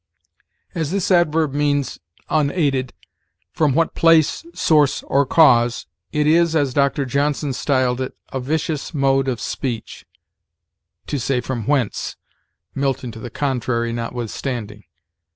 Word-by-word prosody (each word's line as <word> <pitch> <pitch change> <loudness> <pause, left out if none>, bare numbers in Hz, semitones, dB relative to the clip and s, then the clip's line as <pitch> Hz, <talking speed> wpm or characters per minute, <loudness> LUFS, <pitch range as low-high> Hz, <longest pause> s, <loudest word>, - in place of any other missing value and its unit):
As 160 -4 -2
this 195 +1 -1
adverb 160 -4 +3
means 145 -1 0 0.3
unaided 140 -4 0 0.6
from 150 -4 +1
what 165 +1 +2
place, 165 - +3
source, 150 - +2
or 140 0 +1
cause, 120 - +4 0.3
it 150 0 +1
is, 165 +1 +3
as 140 -5 +1
Dr. 140 0 +1
Johnson 140 +2 0
styled 130 -2 0
it, 130 - -5 0.2
"a 135 - -1
vicious 150 +3 -2
mode 135 -1 +2
of 125 -3 -1
speech" 120 -5 -5 1.0
to 145 - -3
say 125 +1 0
from 125 -2 -4
whence, 135 -7 -1 0.6
Milton 135 -3 -2
to 110 - -10
the 120 - -7
contrary 120 -3 -1
notwithstanding. 115 -2 -5
140 Hz, 125 wpm, -20 LUFS, 125-150 Hz, 1.0 s, cause